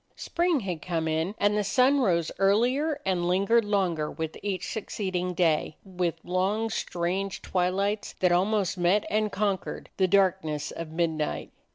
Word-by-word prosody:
Spring 340 -5 0
had 180 -6 -4
come 165 -2 -2
in 160 +6 -1
and 205 +1 +2
the 210 - +1
sun 260 +7 +3
rose 170 -9 +1
ear 195 0 +5
lier 280 +7 +1
and 180 -2 0
lingered 200 +6 +3
longer 185 -7 0
with 160 -1 -5
each 200 -2 -3
succeeding 185 -4 -3
day, 160 -3 +1
with 180 -3 -2
long, 195 +5 0
strange 185 +1 -2
twilights 195 +3 -1
that 180 -1 +3
almost 195 +1 +1
met 180 +4 +3
and 215 0 +1
conquered 200 -2 -2
the 190 - +3
darkness 185 -6 +1
of 165 -1 -6
midnight. 160 -2 -2
190 Hz, 155 wpm, -27 LUFS, 175-210 Hz, -, ear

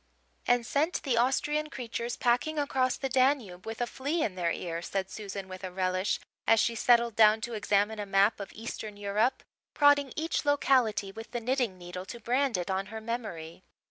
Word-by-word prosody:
"And 245 -1 +3
sent 305 +8 0
the 265 -5 +1
Austrian 295 +5 +1
creatures 240 -2 -4
packing 250 +6 +1
across 265 -3 +1
the 270 - -2
Danube 255 -8 +1
with 225 +2 -5
a - - +2
flea 285 +7 -2
in 205 - -1
their 175 -2 -1
ear," 170 -1 -4
said 190 +2 -3
Susan 200 -2 -6
with 185 0 -9
a 185 - -3
relish, 185 +1 0 0.3
as 225 - +5
she 235 - +2
settled 235 -1 +3
down 215 0 +6
to 240 +1 -4
examine 210 0 +1
a 205 - -3
map 195 +3 +3
of 200 - -7
Eastern 215 -1 -7
Europe, 205 +5 0 0.3
prodding 285 -2 +4
each 320 +2 -1
locality 255 -8 +2
with 225 +3 -9
the 240 - -3
knitting 240 -4 -1
needle 180 +1 -7
to 235 +4 -8
brand 250 +1 +1
it 180 +1 -3
on 190 +1 -1
her 220 - -6
memory. 215 -8 -5
225 Hz, 190 wpm, -29 LUFS, 195-255 Hz, 0.3 s, down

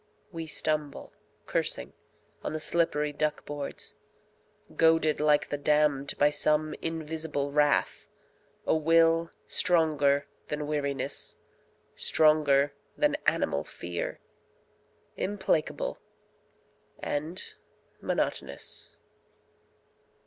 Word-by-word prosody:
We 165 -2 -5
stumble, 155 -2 -2 0.3
cursing, 60 - -2 0.5
on - - -3
the 155 - -2
slippery 150 -2 +1
duck 150 +1 -1
boards. 145 -1 -4 0.8
Goaded 160 -1 +4
like 150 -1 +3
the 145 - -2
damned 145 -1 +2
by 145 +1 +4
some 150 +1 +1
invisible 160 -3 -2
wrath, 145 0 +2 0.6
A - - +3
will 165 +1 +4 0.2
stronger 150 -4 +3 0.2
than 150 0 -3
weariness, 145 -2 -2 0.6
stronger 150 -2 +4 0.2
than - - +3
animal 70 +1 +2
fear, 85 +2 -5 1.0
Implacable 190 -5 -1 1.0
and 155 +5 -4 0.5
monotonous. - - -3
150 Hz, 85 wpm, -29 LUFS, 145-160 Hz, 1.0 s, Goaded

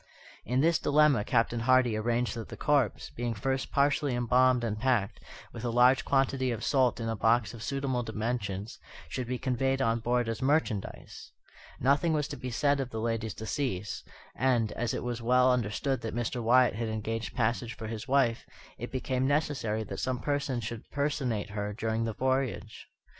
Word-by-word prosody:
In 125 +4 +1
this 165 +1 +3
dilemma 145 -6 +4
Captain 115 +1 +1
Hardy 125 -1 +3
arranged 120 +2 0
that 115 -1 -6
the - - -8
corpse, 140 -6 +1
being 120 -1 -3
first 130 +5 -2
partially 140 -1 +2
embalmed 125 +1 +3
and 105 -2 -2
packed, 120 -5 0 0.3
with - - -7
a 120 - -1
large 125 +2 +4
quantity 135 -1 +1
of 115 -2 -3
salt 130 -4 +2
in 115 - -3
a 115 - -1
box 115 +2 +2
of 115 - -10
suitable 135 -1 -1
dimensions, 110 -3 -3 0.3
should 125 +8 -4
be 125 +1 -2
conveyed 135 +1 0
on 115 -2 +1
board 120 +1 0
as 115 -1 -3
merchandise. 130 -7 -1 0.5
Nothing 140 +6 +2
was 150 -3 0
to - - -5
be 125 - -6
said 140 +3 +1
of 135 -2 -2
the 110 - -5
lady's 115 -1 -2
decease; 110 -4 -3 0.3
and, 120 -5 +1
as 120 -1 -2
it - - -4
was 120 -1 -3
well 125 +2 +4
understood 125 +3 -1
that 115 0 -4
Mr. 120 +1 -2
Wyatt 125 +2 +4
had 115 +2 -3
engaged 110 -2 -4
passage 120 +1 -1
for 110 - -6
his 110 +2 -6
wife, 130 -4 +2 0.3
it - - -6
became 130 0 -1
necessary 140 -7 0
that - - -6
some 130 -1 -1
person 140 -3 -1
should 115 +1 -7
personate 135 -8 -1
her 105 0 -3
during 110 +1 -1
the 115 - -2
voyage. 130 -3 -2
120 Hz, 180 wpm, -29 LUFS, 115-130 Hz, 0.5 s, dilemma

